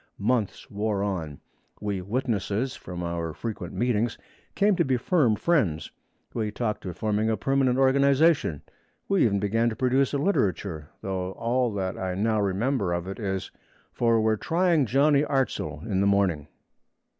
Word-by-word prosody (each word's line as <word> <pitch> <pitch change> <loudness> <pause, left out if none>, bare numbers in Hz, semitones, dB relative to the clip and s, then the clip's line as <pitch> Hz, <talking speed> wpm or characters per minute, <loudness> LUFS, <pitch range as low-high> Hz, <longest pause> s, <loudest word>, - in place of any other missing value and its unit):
Months 110 -1 -1
wore 105 -1 -1
on; 80 -8 -4 0.4
we 100 -3 -2
witnesses, 110 +2 -1
from 90 -1 -7
our 85 -1 -3
frequent 105 -7 -5
meetings, 120 -2 0 0.4
came 205 0 +3
to 170 - +4
be 130 -4 +1
firm 130 - +2
friends. 105 - 0 0.4
We 110 -2 -1
talked 105 -2 -3
of 90 - -6
forming 110 0 0
a 110 - +1
permanent 135 -2 +1
organization. 140 - +3 0.4
We 195 -7 +3
even 100 -3 +2
began 115 +4 +1
to 110 - -5
produce 130 +3 +2
a 145 - 0
literature, 100 - -1
though 95 -1 -3
all 120 +2 0
that 95 -2 -3
I 95 -1 -2
now 110 +2 +1
remember 100 0 0
of 85 +1 -3
it 95 - -6
is, 95 -3 -3 0.4
'For 115 -1 +2
we're 110 0 +2
trying 165 - +2
Johnny 140 +4 +4
Artzle 125 - -2
in 100 -4 0
the 100 - +3
morning.' 95 -7 +1
110 Hz, 155 wpm, -26 LUFS, 95-130 Hz, 0.4 s, to